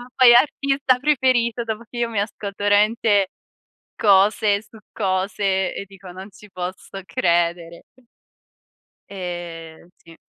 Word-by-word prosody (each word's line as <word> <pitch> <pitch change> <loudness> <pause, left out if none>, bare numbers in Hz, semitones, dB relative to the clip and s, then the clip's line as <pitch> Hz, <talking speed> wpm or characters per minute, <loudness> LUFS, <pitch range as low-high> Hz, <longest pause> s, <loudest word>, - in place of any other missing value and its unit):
Poi, 245 -2 +7
artista 270 -1 +2
preferito, 250 -5 +1
dopo 225 0 -5
che 240 - -10
io 235 -1 -1
mi 215 -3 -2
ascolto, 205 -1 -4
veramente, 205 -1 +3 0.7
cose 205 +1 +3
su 220 0 -17
cose 190 -1 -1
e 200 - -6
dico: 195 -1 -13
"Non 190 +3 -10
ci 210 +1 -17
posso 185 +1 -7
credere." 170 -1 -1 1.3
E, 175 -3 -8
sì. 165 -1 -18
200 Hz, 115 wpm, -21 LUFS, 185-230 Hz, 1.3 s, Poi